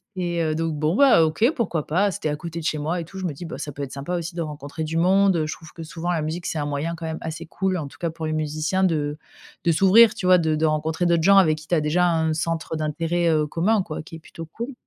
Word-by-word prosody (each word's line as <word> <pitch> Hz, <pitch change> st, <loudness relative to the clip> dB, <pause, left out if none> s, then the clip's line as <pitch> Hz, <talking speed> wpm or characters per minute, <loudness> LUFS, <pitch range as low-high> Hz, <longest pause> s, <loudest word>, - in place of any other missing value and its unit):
Et 175 Hz, -2 st, -1 dB
heu, 155 Hz, -1 st, 0 dB
donc 165 Hz, 0 st, -1 dB
bon 155 Hz, +3 st, 0 dB
bah, 275 Hz, -12 st, +6 dB
OK, 215 Hz, -, +2 dB
pourquoi 175 Hz, -, -1 dB
pas? 195 Hz, +6 st, +2 dB
C'était 155 Hz, -, -4 dB
à 150 Hz, -, -1 dB
côté 170 Hz, +1 st, -6 dB
de 160 Hz, -, -7 dB
chez 155 Hz, -, 0 dB
moi 165 Hz, +4 st, -1 dB
et 165 Hz, -, -5 dB
tout 190 Hz, +3 st, -10 dB
je 190 Hz, -, -4 dB
me 170 Hz, -, -1 dB
dis: 175 Hz, -, -8 dB
«Bah 165 Hz, -, -6 dB
ça 145 Hz, -, -5 dB
peut 140 Hz, +1 st, -6 dB
être 130 Hz, -, -6 dB
sympa 140 Hz, +6 st, -4 dB
aussi 170 Hz, 0 st, -5 dB
de 170 Hz, -, -2 dB
rencontrer 150 Hz, 0 st, -5 dB
du 160 Hz, +1 st, -3 dB
monde». 185 Hz, -1 st, +3 dB
Je 155 Hz, -, -3 dB
trouve 160 Hz, -2 st, -13 dB
que 165 Hz, -, -8 dB
souvent 170 Hz, +2 st, -4 dB
la 165 Hz, -3 st, 0 dB
musique 165 Hz, +3 st, -4 dB
c'est -, -, -3 dB
un 145 Hz, -, -1 dB
moyen 145 Hz, +4 st, -2 dB
quand 165 Hz, 0 st, -7 dB
même 160 Hz, 0 st, -4 dB
assez 160 Hz, 0 st, -6 dB
cool 190 Hz, +3 st, -1 dB
en 150 Hz, -4 st, -4 dB
tout -, -, -15 dB
cas 170 Hz, -, -1 dB
pour 160 Hz, -1 st, -6 dB
les 155 Hz, -, -2 dB
musiciens 155 Hz, +5 st, -1 dB
de 150 Hz, -4 st, 0 dB, 0.5 s
de 170 Hz, -, +4 dB
s'ouvrir 195 Hz, +7 st, +6 dB
tu -, -, -5 dB
vois 185 Hz, 0 st, +7 dB
de 160 Hz, -2 st, +1 dB
de 160 Hz, +1 st, +1 dB
rencontrer 155 Hz, +3 st, 0 dB
d'autres 170 Hz, -1 st, +2 dB
gens 195 Hz, +2 st, +6 dB
avec 155 Hz, -5 st, +4 dB
qui 155 Hz, -, -14 dB
tu 175 Hz, -, +2 dB
as -, -, +3 dB
déjà 175 Hz, +4 st, +2 dB
un 160 Hz, -1 st, +1 dB
centre 165 Hz, 0 st, -2 dB
d'intérêt, 165 Hz, +3 st, -1 dB
heu, 155 Hz, -2 st, +2 dB
commun 195 Hz, +7 st, +1 dB
quoi 155 Hz, -, -6 dB
qui 165 Hz, -, -11 dB
est -, -, -14 dB
plutôt 165 Hz, +1 st, -10 dB
cool. 235 Hz, -, -6 dB
165 Hz, 295 wpm, -23 LUFS, 155-175 Hz, 0.5 s, vois